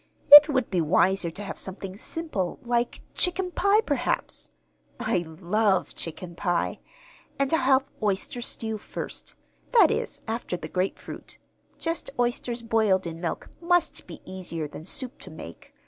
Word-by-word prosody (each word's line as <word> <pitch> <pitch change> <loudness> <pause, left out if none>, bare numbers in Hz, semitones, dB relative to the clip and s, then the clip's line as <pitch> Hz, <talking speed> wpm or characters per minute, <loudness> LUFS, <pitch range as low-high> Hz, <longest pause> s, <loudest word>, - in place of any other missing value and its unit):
"It 295 +1 +13
would 260 -6 0
be 180 -3 +2
wiser 180 +2 +3
to 200 +5 -7
have 200 - -5
something 190 0 -5
simple, 210 - -3
like 240 0 -1
chicken 360 0 0
pie, 400 +4 +3
perhaps. 285 - -2 0.5
I - - +1
love 190 +4 +1
chicken 170 +1 -6
pie! 175 -1 -1 0.6
And 275 +2 0
I'll 320 - +4
have 265 +1 +3
oyster 210 +3 0
stew 220 -2 -3
first - - -6 0.4
that 470 - +7
is, - - -2
after 225 -5 -3
the - - -7
grapefruit. 185 +1 -4 0.4
Just 330 0 -3
oysters 240 0 -1
boiled 215 -5 +2
in 165 0 -6
milk 170 - -3
must 350 0 +1
be - - -10
easier 175 -4 -5
than 150 +2 -10
soup 250 +6 -2
to - - -10
make. 155 - -11
210 Hz, 145 wpm, -26 LUFS, 180-265 Hz, 0.6 s, It